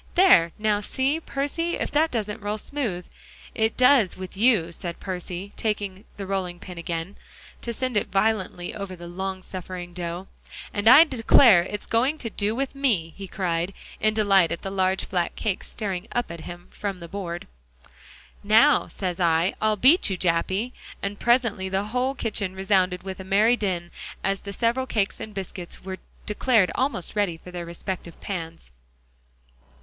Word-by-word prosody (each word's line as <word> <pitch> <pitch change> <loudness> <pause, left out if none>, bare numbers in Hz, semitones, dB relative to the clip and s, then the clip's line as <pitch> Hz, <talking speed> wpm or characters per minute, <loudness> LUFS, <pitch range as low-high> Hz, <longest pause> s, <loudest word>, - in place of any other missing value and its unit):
"There, 345 - +6
now 210 -1 +1
see, 270 +8 0
Percy, 330 +3 -2
if - - -3
that 310 +2 +3
doesn't 215 -4 -3
roll 205 +1 -2
smooth." 215 -8 -3 0.5
"It 220 0 0
does 250 -6 +5
with 185 0 -7
you," 205 -6 +3
said 170 0 -6
Percy, 185 +1 -5
taking 205 -3 -2
the 200 - -5
rolling 190 -2 -2
pin 180 -1 -9
again, 170 +2 -4 0.4
to 235 - -3
send 255 +1 -2
it 210 - +1
violently 195 -3 0
over 200 -3 -6
the 175 -1 -10
long 190 +1 -4
suffering 180 -1 -7
dough, 175 +1 -5 0.5
"and 205 +1 -1
I 270 +6 +10
declare, 235 - +6
it's 210 +2 -5
going 255 +7 +1
to 230 -6 -5
do 210 +2 -1
with 270 +1 -2
me," 220 - 0
he 195 -1 -7
cried, 180 -1 -2 0.2
in 215 0 +2
delight 195 -5 +4
at 170 - -4
the 195 - -4
large 190 0 +1
flat 175 -2 -1
cake 205 -4 -2
staring 195 -5 -4
up 240 -7 -1
at 170 -1 -7
him 175 0 -9
from 200 -2 -4
the 170 -1 -9
board. 175 -2 -5 1.0
"Now, 225 +8 +5
says 180 -2 -4
I, 170 +1 +3
I'll 215 0 +3
beat 270 - +5
you, 190 - -1
Jappy!" 185 +7 0 0.3
And 200 +1 -3
presently 235 -6 +2
the 190 +1 0
whole 255 +3 0
kitchen 205 -6 -2
resounded 190 -2 +1
with 190 0 -6
a - - -6
merry 210 +5 +4
din, 180 -6 -2 0.3
as 195 0 0
the 200 - -7
several 240 +4 0
cakes 205 -5 0
and 215 - -6
biscuits 190 -3 -7
were 190 0 -5 0.3
declared 215 -2 +2
almost 255 - -2
ready 200 -6 +1
for 180 - -10
their 175 -1 -5
respective 170 0 -6
pans. 165 - -6
195 Hz, 170 wpm, -25 LUFS, 180-225 Hz, 1.0 s, I